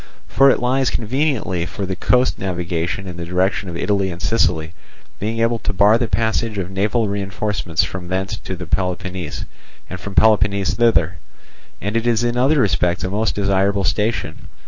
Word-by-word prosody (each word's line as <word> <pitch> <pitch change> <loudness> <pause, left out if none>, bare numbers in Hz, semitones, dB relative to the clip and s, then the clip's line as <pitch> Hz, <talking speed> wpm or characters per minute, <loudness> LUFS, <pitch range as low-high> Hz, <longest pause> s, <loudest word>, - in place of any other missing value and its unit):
For 135 +1 +5
it - - +3
lies 130 +1 +1
conveniently 115 - -1
for 100 - -4
the 95 0 -3
coast 125 +6 +2
navigation 90 -1 -2
in 90 -2 -7
the 85 - -5
direction 90 +2 0
of 85 - -5
Italy 100 0 0
and 85 -1 -6
Sicily, 85 -5 +1 0.5
being 110 +3 -2
able 115 0 +1
to 100 - -3
bar 105 +3 +5
the 120 - 0
passage 110 -1 0
of 95 -1 -3
naval 105 +4 +1
reinforcements 100 -3 -1
from 90 -2 -5
thence 95 +3 -2
to 95 - -6
Peloponnese, 90 0 -3 0.5
and 90 - -5
from 95 +2 -8
Peloponnese 100 -3 +3
thither; 90 -9 +2 0.6
and 105 +3 -3
it 115 +1 +1
is 120 0 +2
in 120 0 0
other 135 +5 +3
respects 90 -5 +1
a 95 - -2
most 110 +2 0
desirable 100 0 +1
station. 105 -3 -1
100 Hz, 170 wpm, -20 LUFS, 90-115 Hz, 0.6 s, For